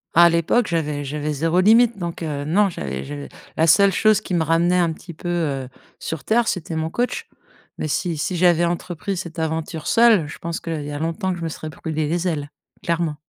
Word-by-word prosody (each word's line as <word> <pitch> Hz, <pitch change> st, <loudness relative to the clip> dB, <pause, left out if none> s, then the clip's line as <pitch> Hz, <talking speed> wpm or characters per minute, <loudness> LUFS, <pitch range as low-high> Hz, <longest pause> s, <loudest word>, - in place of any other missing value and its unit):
À 170 Hz, +1 st, +8 dB
l'époque, 170 Hz, +8 st, +2 dB
j'avais 150 Hz, -3 st, -1 dB
j'avais 150 Hz, +2 st, -3 dB
0 165 Hz, +4 st, +1 dB
limite. 225 Hz, +3 st, +5 dB
Donc 170 Hz, -3 st, -5 dB
heu, 145 Hz, -3 st, -3 dB
non, 195 Hz, +6 st, +3 dB
j'avais 70 Hz, -, -5 dB
j'avais 70 Hz, -1 st, -7 dB, 0.3 s
la 160 Hz, -, +4 dB
seule 195 Hz, +5 st, +6 dB
chose 215 Hz, +2 st, +3 dB
qui 185 Hz, -, -3 dB
me 165 Hz, -, +2 dB
ramenait 170 Hz, +3 st, +2 dB
un 170 Hz, -2 st, +2 dB
petit 170 Hz, +2 st, -11 dB
peu, 165 Hz, -, -8 dB
heu, 145 Hz, -7 st, -1 dB, 0.3 s
sur 160 Hz, -2 st, -5 dB
terre, 230 Hz, +1 st, +2 dB
c'était 170 Hz, -3 st, -2 dB
mon 160 Hz, 0 st, -2 dB
coach. 245 Hz, +5 st, -2 dB, 0.5 s
Mais -, -, -2 dB
si 165 Hz, +3 st, -1 dB
si 180 Hz, +5 st, -2 dB
j'avais 175 Hz, -1 st, +4 dB
entrepris 175 Hz, +2 st, -3 dB
cette 170 Hz, -2 st, -6 dB
aventure 160 Hz, 0 st, -3 dB
seule, 225 Hz, -9 st, +5 dB
je 150 Hz, -, -8 dB
pense 170 Hz, 0 st, -4 dB
qu'il 160 Hz, -3 st, -4 dB
y 145 Hz, -, -6 dB
a 145 Hz, -, -4 dB
longtemps 165 Hz, +4 st, -1 dB
que 175 Hz, -, -6 dB
je -, -, -5 dB
me 165 Hz, -, -2 dB
serais 155 Hz, 0 st, -7 dB
brûlé 155 Hz, 0 st, -3 dB
les 175 Hz, +3 st, -1 dB
ailes, 145 Hz, -4 st, -3 dB, 0.3 s
clairement. 170 Hz, -2 st, 0 dB
165 Hz, 215 wpm, -22 LUFS, 155-180 Hz, 0.5 s, À